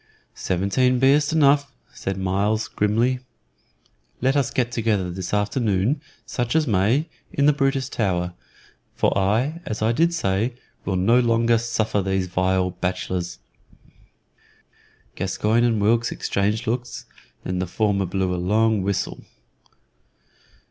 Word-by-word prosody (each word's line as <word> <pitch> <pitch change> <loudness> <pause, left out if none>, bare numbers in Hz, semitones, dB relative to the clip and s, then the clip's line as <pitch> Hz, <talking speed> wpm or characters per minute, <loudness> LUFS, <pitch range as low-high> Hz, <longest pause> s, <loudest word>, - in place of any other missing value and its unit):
"Seventeen 100 +8 +1
be'st 145 +3 +4
enou," 145 -2 +5 0.3
said 95 0 -4
Myles, 100 +4 0
grimly. 115 +5 +1 1.0
"Let 135 +3 +1
us 140 -4 +2
get 120 -2 -1
together 105 -6 0
this 90 0 -5
afternoon, 105 +3 0 0.2
such 120 +2 -2
as 160 -1 +3
may, 115 - +2 0.2
in 140 - +1
the 150 - +6
Brutus 135 -2 0
Tower, 90 -8 -1 0.6
for - - +1
I, 115 - +1
as 110 0 -4
I 110 - +3
did 165 +8 +2
say, 115 - -1 0.3
will 95 - -1
no 105 +7 +4
longer 115 -1 +3
suffer 110 -3 -1
these 95 -1 0
vile 95 0 0
bachelors." 90 0 -3 1.8
Gascoyne 105 +5 0
and 115 -3 +2
Wilkes 115 +3 +2
exchanged 105 +3 -1
looks, 120 +2 -3 0.4
and 90 - -2
then 90 - -1
the 90 - -2
former 100 0 0
blew 95 0 -1
a 90 - -2
long 110 +3 +2
whistle. 100 0 -2
110 Hz, 130 wpm, -23 LUFS, 95-125 Hz, 1.8 s, the